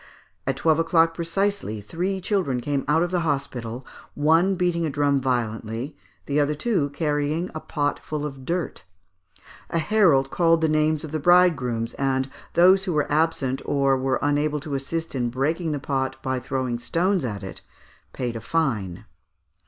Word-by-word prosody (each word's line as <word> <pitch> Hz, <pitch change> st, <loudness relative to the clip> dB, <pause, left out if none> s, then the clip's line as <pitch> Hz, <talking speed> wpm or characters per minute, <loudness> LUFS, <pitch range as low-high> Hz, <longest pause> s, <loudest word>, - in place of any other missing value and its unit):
At 135 Hz, -, +1 dB
twelve 160 Hz, +3 st, +2 dB
o'clock 165 Hz, 0 st, +3 dB
precisely, 170 Hz, -, -1 dB
three 180 Hz, -, -3 dB
children 180 Hz, -, 0 dB
came 140 Hz, +2 st, -1 dB
out 160 Hz, +3 st, +3 dB
of 175 Hz, -, -2 dB
the 180 Hz, -, +1 dB
hospital, 135 Hz, -6 st, -3 dB, 0.3 s
one 165 Hz, +6 st, +3 dB
beating 175 Hz, -2 st, 0 dB
a 160 Hz, -, 0 dB
drum 140 Hz, -1 st, +1 dB
violently, 115 Hz, 0 st, -2 dB, 0.3 s
the 145 Hz, +1 st, 0 dB
other 150 Hz, +1 st, +1 dB
two 160 Hz, -4 st, 0 dB
carrying 150 Hz, +3 st, -1 dB
a 155 Hz, -, -4 dB
pot 145 Hz, -2 st, -2 dB
full 150 Hz, -1 st, -3 dB
of 135 Hz, -3 st, -7 dB
dirt; 170 Hz, +3 st, -3 dB, 0.9 s
a -, -, -1 dB
herald 165 Hz, -7 st, +3 dB
called 165 Hz, -1 st, +3 dB
the 160 Hz, -, +3 dB
names 155 Hz, 0 st, +1 dB
of 155 Hz, -, -7 dB
the 155 Hz, -, -1 dB
bride 175 Hz, +2 st, +5 dB
grooms, 120 Hz, -3 st, -3 dB
and 135 Hz, -1 st, 0 dB, 0.2 s
those 190 Hz, +2 st, +6 dB
who 180 Hz, -, -1 dB
were 150 Hz, -1 st, 0 dB
absent 145 Hz, -4 st, +1 dB
or 140 Hz, -1 st, +2 dB
were 130 Hz, 0 st, 0 dB
unable 145 Hz, +1 st, +1 dB
to 150 Hz, -1 st, -6 dB
assist 160 Hz, +5 st, -3 dB
in 125 Hz, -3 st, -1 dB
breaking 155 Hz, +7 st, -1 dB
the 150 Hz, -, -1 dB
pot 135 Hz, -1 st, -2 dB
by 130 Hz, -2 st, -1 dB
throwing 130 Hz, -1 st, -2 dB
stones 175 Hz, +8 st, 0 dB
at 105 Hz, -5 st, -4 dB
it, 95 Hz, -, -8 dB, 0.5 s
paid 120 Hz, -2 st, -3 dB
a 115 Hz, -, -5 dB
fine. 115 Hz, -, -1 dB
145 Hz, 170 wpm, -24 LUFS, 130-165 Hz, 0.9 s, those